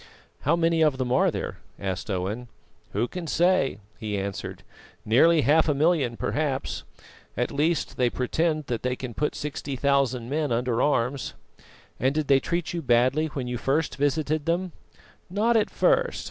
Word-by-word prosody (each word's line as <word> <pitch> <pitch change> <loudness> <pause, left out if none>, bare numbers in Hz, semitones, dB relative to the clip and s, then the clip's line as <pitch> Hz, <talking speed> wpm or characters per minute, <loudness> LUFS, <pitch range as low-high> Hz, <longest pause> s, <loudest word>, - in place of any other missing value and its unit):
"How 150 +5 +2
many 165 -1 +2
of 150 -4 +3
them 130 -2 -2
are 130 - +4
there?" - - -4 0.2
asked 95 +1 -4
Owen. 100 +6 -2 0.5
"Who 110 +5 +1
can 180 +2 -6
say?" 175 - +2 0.2
he 105 -2 -3
answered. 100 0 -5 0.4
"Nearly 155 +9 +5
half 155 +3 +4
a 145 - +2
million, 145 -6 +2
perhaps; 145 -3 -2 0.6
at 125 - 0
least 155 +2 0
they 125 -1 +3
pretend 155 +5 0
that 120 -4 -3
they 125 0 -1
can 125 -2 -6
put 150 +6 -1
sixty 145 -1 -4
thousand 130 -3 +1
men 145 +1 -1
under 120 0 +1
arms." 130 -2 0 0.6
"And 130 +3 +1
did 155 -2 -1
they 135 -1 +6
treat 170 +4 -2
you 170 - -2
badly 130 +4 +3
when 140 -4 -4
you 125 -1 -3
first 145 +6 0
visited 150 +2 0
them?" 175 +2 0 0.6
"Not 215 +6 +2
at 215 -2 +3
first. - - +2
140 Hz, 165 wpm, -26 LUFS, 125-160 Hz, 0.6 s, they